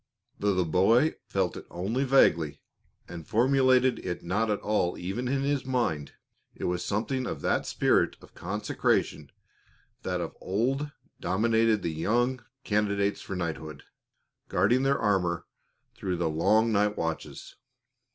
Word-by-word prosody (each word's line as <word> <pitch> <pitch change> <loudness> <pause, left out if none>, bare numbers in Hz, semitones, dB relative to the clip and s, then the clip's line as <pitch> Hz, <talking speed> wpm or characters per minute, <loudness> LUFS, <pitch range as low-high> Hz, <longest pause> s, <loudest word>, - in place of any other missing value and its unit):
Though 100 -1 +1
the 90 -1 +1
boy 110 - +3
felt 95 -2 -1
it - - -9
only 105 +10 -2
vaguely, 85 - +3 0.5
and 85 -3 -9
formulated 130 0 +3
it 90 -2 -5
not 105 +6 0
at 105 - 0
all 105 -4 0
even 100 +8 -3
in 135 +1 0
his 140 -1 0
mind, 120 - -1 0.4
it - - -9
was 90 0 -1
something 125 +5 -1
of - - -5
that - - 0
spirit - - +2
of - - -17
consecration 105 +4 -1 0.7
that - - -2
of - - -5
old 135 +9 -1 0.3
dominated 110 +3 +2
the 85 - -2
young 120 +9 0 0.2
candidates 100 -1 0
for 95 - -6
knighthood, 80 -3 -5 0.7
guarding 105 +8 +3
their 135 +1 +2
armor 90 -5 0 0.5
through 100 -7 -3
the 85 -2 0
long 110 +8 +3
night 105 0 +1
watches. 80 -1 -5
105 Hz, 140 wpm, -28 LUFS, 90-125 Hz, 0.7 s, boy